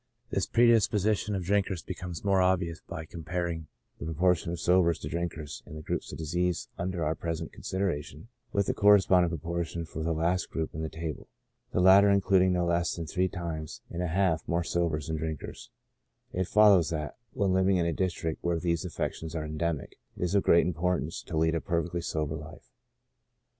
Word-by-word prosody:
This - - 0
predisposition 110 -3 +3
of 95 - -2
drink 100 +2 +1
ers 90 -4 -4
becomes 90 -1 -6
more 95 -1 +4
obvious 90 -3 +1
by 85 -2 -6
comparing 85 0 -4 0.3
the - - -5
proportion 85 +1 +1
of 85 - -4
sobers 85 -2 +3
to - - -6
drinkers 80 -3 -4
in 75 - -9
the 75 - -7
groups - - -3
of - - -7
diseases 85 +2 -1
under 90 -1 -2
our 75 - +1
present 80 -1 -4
consideration 85 -3 -3 0.2
with 100 -1 +1
the - - 0
corresponding 95 -3 +5
proportion 85 +1 -3
for 80 0 -6
the 80 +1 0
last 85 +3 0
group 80 -1 -3
in 80 - -4
the 80 - -3
table, 80 -1 -6 0.4
the - - 0
latter 95 +2 +7
including 95 -2 +4
no 90 -1 +1
less 85 0 +1
than 85 - -4
three 90 +4 0
times 80 -4 -5
and 85 - -3
a 90 - 0
half 85 -2 +1
more 85 +1 +1
sobers 85 -4 -1
than 80 0 -2
drinkers; 80 -1 -5 0.6
it 90 0 -1
fol 105 0 +6
lows 90 -5 +4
that, 75 -2 -3 0.2
when 95 -2 +1
living 95 0 +3
in 85 - +1
a 85 - 0
district 85 -3 -2
where 85 -1 +1
these 85 -1 0
affections 80 -2 -4
are 80 -1 -2
endemic, 75 -1 -3 0.2
it - - -3
is 90 - 0
of 100 - +4
great 85 - +5
importance 85 -2 -1
to 80 - -5
lead 80 +1 +3
a 85 - 0
perfectly 85 -1 -1
sober 75 -2 -2
life. 75 0 -11
85 Hz, 195 wpm, -29 LUFS, 80-95 Hz, 0.6 s, latter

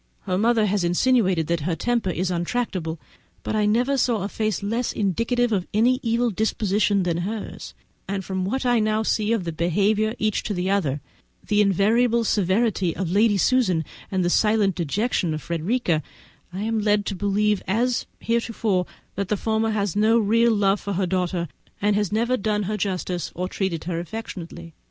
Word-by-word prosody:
Her 185 -2 -2
mother 225 +2 +3
has 200 -2 0
insinuated 185 -1 +2
that 170 +1 0
her 165 +3 -1
temper 235 +3 0
is 180 +1 -1
intractable, 175 -3 -2 0.4
but - - -2
I 210 -1 +2
never 250 +6 +2
saw 230 -5 +1
a 200 - -3
face 215 -3 -2
less 230 +4 -1
indicative 230 +5 0
of 190 -4 0
any 245 +4 +3
evil 235 0 +1
disposition 205 -1 +1
than 170 -2 0
hers; 200 +5 -5 0.3
and 195 -1 -3
from 190 -1 -2
what 260 +8 -2
I 245 -2 +3
can 215 0 +1
see 215 0 0
of 225 -5 +1
the 170 - -3
behaviour 200 +7 +1
of 225 - -6
each 215 -1 0
to 210 - -2
the 180 +2 -1
other, 150 -8 0 0.5
the 210 0 +3
invariable 225 +5 +3
severity 200 -3 +1
of 180 -3 -3
Lady 205 +1 +3
Susan 185 -8 +2 0.2
and 185 -2 0
the 175 - +1
silent 210 -2 +3
dejection 175 - -1
of 155 - -6
Frederica, 170 0 0 0.5
I 190 +3 -4
am 225 0 0
led 205 -1 +2
to 200 - -3
believe 205 +1 +1
as 235 +5 0
heretofore 225 -5 0 0.3
that 200 0 -3
the 210 - 0
former 220 +2 0
has 205 -4 -1
no 220 +2 +4
real 230 +2 +3
love 200 -1 +2
for 200 - -3
her 190 +1 0
daughter, 180 -1 -1 0.3
and 205 0 +2
has 205 -2 0
never 235 +4 +1
done 210 -1 0
her 210 +2 -2
justice 180 -4 -2
or 180 +1 -2
treated 185 -4 -2
her 170 -1 -3
affectionately. 170 -3 -7
205 Hz, 185 wpm, -23 LUFS, 180-225 Hz, 0.5 s, no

